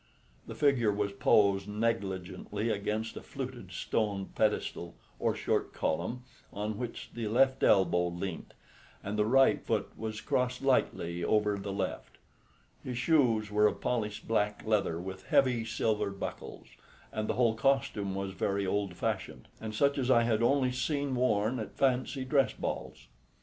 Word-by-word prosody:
The - - -7
figure 130 -7 +3
was 100 0 -1
posed 100 0 +3
negligently 105 -1 -2
against 110 +2 -2
a - - -6
fluted 130 -8 -7
stone 100 +1 -1
pedestal 85 -5 -1 0.2
or - - +1
short - - -1
column 90 +11 -2 0.3
on 105 +1 -4
which 120 -2 -6
the 115 -2 -3
left 130 +4 +3
elbow 90 -3 +4
leant, 85 0 -5 0.5
and 100 +1 -3
the 105 0 +2
right 135 +3 +4
foot - - -1
was 110 -1 -5
crossed 125 +3 -1
lightly 85 -10 +1
over 105 +1 +2
the 100 0 -5
left. 95 -1 -4 0.7
His 125 -2 -4
shoes 120 -7 +2
were 105 0 +5
of - - -2
polished 110 -4 -2
black 105 -2 0
leather 105 -6 +1
with 95 +1 -7
heavy 125 -4 +3
silver 110 -2 0
buckles, 100 0 -7 0.5
and 110 0 -3
the - - 0
whole 120 -2 +3
costume 115 -5 0
was 95 0 -3
very 100 +1 -1
old 100 -1 -1
fashioned, - - -3
and 110 -1 -6
such 140 +4 +2
as 130 -1 -1
I 120 -2 +5
had 115 -1 +1
only 130 +1 +3
seen 140 +2 -1
worn 120 -1 +1
at 110 - -7
fancy 130 0 +1
dress 135 -2 +2
balls. - - -5
110 Hz, 155 wpm, -31 LUFS, 100-125 Hz, 0.7 s, were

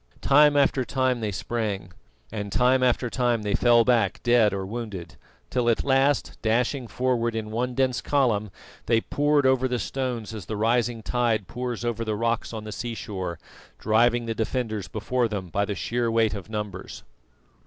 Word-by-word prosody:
Time 145 +1 +5
after 135 -2 +3
time 130 -1 0
they 110 -2 -2
sprang, 100 -3 -3 0.4
and 105 -2 -5
time 130 +3 +3
after 125 0 +2
time 120 -2 0
they 105 - -1
fell 120 -1 +4
back 115 -6 +2
dead 120 -3 +4
or 95 -1 -3
wounded, 100 - -6 0.4
till 125 -2 +1
at 115 - +1
last, 135 +1 +1
dashing 120 +3 0
forward 120 0 0
in 110 -1 -4
one 125 +2 -2
dense 130 -1 +1
column, 115 -8 +1 0.4
they 115 -1 +4
poured 145 +3 +1
over 130 0 +3
the 125 -1 -1
stones 125 -4 -3
as 105 -5 -8
the 110 - -3
rising 115 +1 +1
tide 115 -5 0
pours 120 0 -4
over 115 -1 -1
the 110 -1 -2
rocks 115 +1 -1
on 110 -2 -6
the 110 - -7
sea 120 +2 -4
shore, 95 -6 -5 0.4
driving 120 +2 +2
the 115 - -2
defenders 110 -3 -2
before 115 +7 -1
them 100 -5 -5
by 100 +4 0
the 100 - -3
sheer 120 +4 -1
weight 115 -2 +2
of 100 0 -7
numbers. 105 -4 -6
115 Hz, 175 wpm, -25 LUFS, 105-125 Hz, 0.4 s, Time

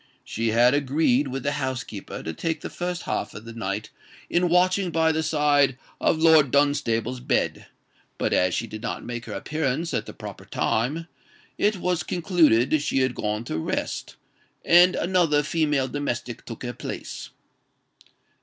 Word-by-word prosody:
She 115 +1 -3
had 120 +3 +4
agreed 145 -1 +2
with 135 0 -4
the 140 - 0
housekeeper 130 -7 -4
to 80 - -4
take 160 - -3
the - - -6
first 180 0 -3
half - - -3
of 105 - -9
the 115 - -8
night 105 -1 -4 0.4
in 175 0 +2
watching 185 +2 +3
by 160 0 +2
the 160 0 0
side 145 -4 +2 0.2
of - - +2
Lord 160 -3 +6
Dunstable's 130 -4 +1
bed; 125 - -1 0.5
but - - 0
as 90 0 +2
she 115 - -1
did 110 -1 -8
not 120 - -4
make 120 -1 -5
her 105 - -6
appearance 155 - -2
at - - -2
the - - -8
proper - - -9
time, 145 +9 -1 0.5
it 210 +1 +3
was 180 -1 0
concluded 155 - +3
she 135 - +1
had 130 -1 +1
gone 105 0 -2
to 80 -9 -3
rest, - - -3 0.5
and 175 +2 +6
another 170 -5 +2
female 150 -3 +1
domestic 125 -4 -4
took 115 0 -8
her 120 0 -4
place. - - -7
145 Hz, 165 wpm, -25 LUFS, 120-160 Hz, 0.5 s, Lord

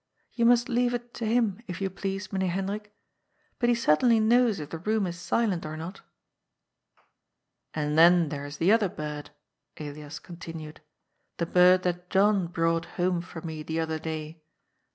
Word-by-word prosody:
You 235 - +1
must 240 0 +4
leave 245 0 +1
it 240 0 -7
to 230 - -3
him, 225 -4 +1
if 180 -3 -5
you 195 -1 -2
please, 195 +1 -4
Meneer 190 -1 0
Hendrik. 200 +3 -3 0.7
But 240 - +2
he 240 - +4
certainly 230 +3 +4
knows 225 -2 +3
if 150 -1 -7
the 165 - -5
room 215 +3 0
is 175 -1 -5
silent 200 -2 0
or 155 0 -6
not." 165 +5 -6
^^ - - -18 1.7
And 150 -1 -1
then 170 0 +6
there 145 -2 -5
is 145 +1 -8
the 175 +4 +3
other 215 -3 +4
bird," 150 -2 -6 0.5
Elias 150 0 -7
continued, 165 -3 -9 0.5
*^ - - -50
the 170 - 0
bird 180 +1 +5
that 180 0 -2
John 195 -2 +3
brought 165 -1 0
home 180 -1 +1
for 170 -2 -9
me 160 -2 -5
the 160 +1 -3
other 160 -1 -2
day. 160 0 -6
180 Hz, 175 wpm, -27 LUFS, 160-210 Hz, 1.7 s, then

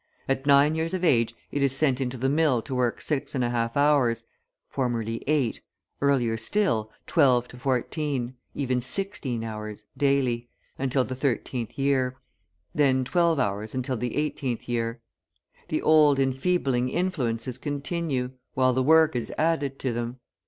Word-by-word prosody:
At 135 +1 -1
nine 140 +2 +6
years 165 +3 -1
of 185 - -4
age 115 -9 +3 0.2
it 145 - -1
is 135 -1 +2
sent 135 -2 +1
into 130 0 -2
the 130 +2 0
mill 140 -5 +2
to 135 - -6
work 125 -2 0
6.5 125 -5 -1
hours 140 -5 +3 0.4
(formerly 115 -4 -2
8, 140 -6 +1 0.4
earlier 125 -5 +2
still, 115 - 0 0.2
12 125 -3 +3
to 125 - -12
14, 130 0 -1 0.2
even 130 -3 0
16 135 - -2
hours) 105 -1 -6
daily, 130 -4 +1 0.3
until 130 0 +1
the 130 - -5
thirteenth 125 -2 -2
year; 130 -2 +1 0.6
then 135 -3 +3
twelve 170 +3 +2
hours 105 -2 -2
until 130 0 -1
the 120 +1 -3
eighteenth 140 -5 -2
year. 115 0 -2 0.7
The - - -2
old 150 -3 +5
enfeebling 135 -2 +1
influences 130 -8 -2
continue, 145 -3 -2 0.2
while 130 -1 +3
the 130 - +1
work 160 +1 +5
is 120 - -2
added 145 -4 0
to 130 -3 -2
them. 120 +1 -3
130 Hz, 145 wpm, -26 LUFS, 120-145 Hz, 0.7 s, nine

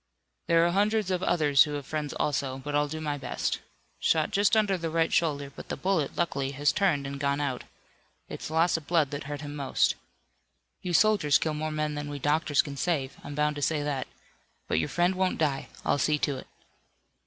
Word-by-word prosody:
"There 165 0 +5
are 175 - +2
hundreds 205 +1 +1
of 180 -1 0
others 150 -6 +4
who 150 - -5
have 145 -2 -4
friends 150 0 -3
also, 135 -2 -1
but 145 +2 -6
I'll 145 0 +2
do 155 +2 -5
my 150 -2 -3
best. - - -2 0.4
Shot 160 -1 +2
just 205 +2 +3
under 205 -3 +3
the 165 -2 -3
right 165 0 +1
shoulder, 145 -4 +1
but - - -10
the - - -3
bullet, 170 -2 0
luckily, 140 -5 -1
has 145 +2 +2
turned 170 -9 +1
and 140 0 -5
gone 140 0 0
out. 135 -4 -2 0.6
It's - - -6
loss 165 +2 +3
of 155 - -10
blood 160 -5 +2
that 145 0 -5
hurt 145 0 -5
him 145 -1 -6
most. 140 -2 +1 0.9
You 180 - -3
soldiers 175 -5 +4
kill 155 - -1
more 155 +1 -2
men 155 0 -1
than 145 0 -4
we 145 - -4
doctors 145 +1 +2
can 140 -2 -7
save. 140 -4 -1
I'm 145 - -7
bound 150 0 +1
to - - -4
say 150 0 +1
that. 145 -3 -2 0.6
But 80 - +1
your 80 - -1
friend 175 +2 +2
won't 185 0 0
die. 145 -4 0 0.2
I'll 145 - +2
see 150 +3 +2
to 145 -1 0
it." - - -10
150 Hz, 210 wpm, -28 LUFS, 145-170 Hz, 0.9 s, There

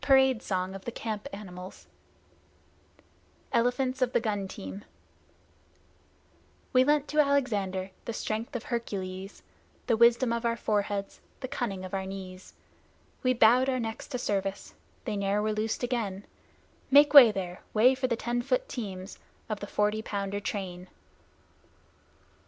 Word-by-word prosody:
Parade 265 -4 +5
Song 185 -1 -2
of 195 0 -9
the 235 - -3
Camp 215 -3 -4
Animals 185 -2 -9 1.7
ELEPHANTS 250 +2 +1
OF 255 -1 +1
THE - - +4
GUN 205 -4 -2
TEAMS 95 - -8 1.9
We 255 0 +6
lent 295 +1 +2
to 305 - 0
Alexander 210 -10 +1
the - - -3
strength 225 +2 -4
of 245 - -3
Hercules, 195 -5 -5 0.4
The 230 - +2
wisdom 235 +1 +4
of 235 0 -2
our 230 0 0
foreheads, 205 -2 -2 0.2
the 260 - -3
cunning 230 -9 -3
of 185 - -9
our 190 -1 -2
knees; 190 -1 -9 0.7
We 255 -1 +3
bowed 245 +4 +5
our 255 -1 0
necks 225 -1 -4
to 260 - -3
service: 195 -4 -2 0.3
they 220 -4 -2
ne'er 200 0 0
were 215 +1 0
loosed 215 +3 -2
again, 215 -6 -2 0.6
Make 290 +2 +7
way 260 -6 +11
there 185 -3 -5
way 235 +4 +5
for 260 0 -1
the 235 - 0
ten 240 +1 -2
foot - - 0
teams 195 - -6 0.3
Of 215 -2 -2
the 205 - -6
Forty 210 +1 0
Pounder 200 -1 -3
train! 185 -3 -5
220 Hz, 145 wpm, -29 LUFS, 195-245 Hz, 1.9 s, way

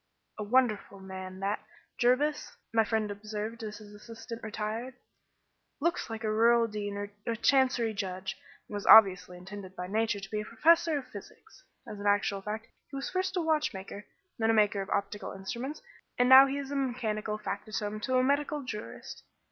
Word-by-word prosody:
"A - - -2
wonderful 215 -3 +1
man 190 0 -8
that, 200 +2 -1 0.4
Jervis," 280 +5 +1 0.2
my 225 -1 +5
friend 220 -2 -1
observed 215 +2 -5
as 215 -1 -6
his 210 -1 -13
assistant 225 +2 -9
retired. 220 +4 -4 0.8
"Looks 340 -1 -1
like 225 0 -6
a 215 - 0
rural 230 +2 +4
dean 205 -2 -4
or 205 0 -5 0.2
a 230 - 0
chancery 250 -1 +2
judge, 190 -2 -4 0.3
and - - -11
was 205 -1 -4
obviously 185 -4 +7
intended 190 +1 -9
by 180 - -5
Nature 215 +2 0
to 195 0 -9
be 210 -1 -1
a - - -7
professor 325 +7 +3
of 265 -3 -6
physics. 235 - -13 0.2
As 210 - -7
an 205 - -2
actual 205 -1 +2
fact 215 +3 -5 0.2
he - - -9
was 275 - -4
first 370 0 -1
a - - +2
watchmaker, 295 -11 -2 0.4
then 225 0 +2
a - - +5
maker 210 -2 +3
of 195 - -6
optical 200 +1 -2
instruments, 240 - -6 0.3
and 245 - +4
now 265 +1 +10
he 275 +1 -2
is 280 -1 -5
mechanical 230 -6 -2
factotum 210 0 -4
to 255 +3 0
a 255 - +4
medical 285 +2 0
jurist. 215 -4 -7
220 Hz, 180 wpm, -30 LUFS, 205-255 Hz, 0.8 s, now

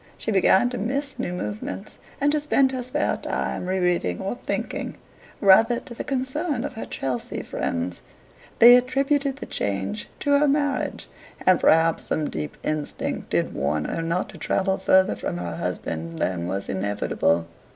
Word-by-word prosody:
She 225 - -3
began 195 +3 +4
to 250 - -3
"miss" 270 +5 -2
new 210 - -2
movements, 105 - -5 0.2
and 285 +1 +3
to 300 - +2
spend 275 -2 +3
her 260 -1 -3
spare 250 +1 0
time 180 - -3
re 190 +1 0
reading 175 - +1
or 195 - -2
thinking, 245 - -4 0.4
rather 225 +5 +5
to 250 - -10
the - - -5
concern 270 +1 -2
of - - -4
her 225 - -6
Chelsea 130 -3 -3
friends. 85 +1 -3 0.6
They 240 +2 +10
attributed 275 +2 +1
the 275 - -7
change 105 - -3
to 285 - 0
her 295 - +3
marriage, 285 0 0 0.4
and 185 -2 +5
perhaps 165 0 +4
some 155 -1 -1
deep 75 -1 -5
instinct 155 -1 -3
did - - 0
warn 75 +2 -1
her - - -2
not 165 +2 -1
to - - -11
travel 190 0 0
further 190 +1 +4
from 85 - -4
her 85 -2 -4
husband 80 0 -4
than 85 -1 -1
was 95 +2 -3
inevitable. 95 -4 0
190 Hz, 165 wpm, -24 LUFS, -, 0.6 s, They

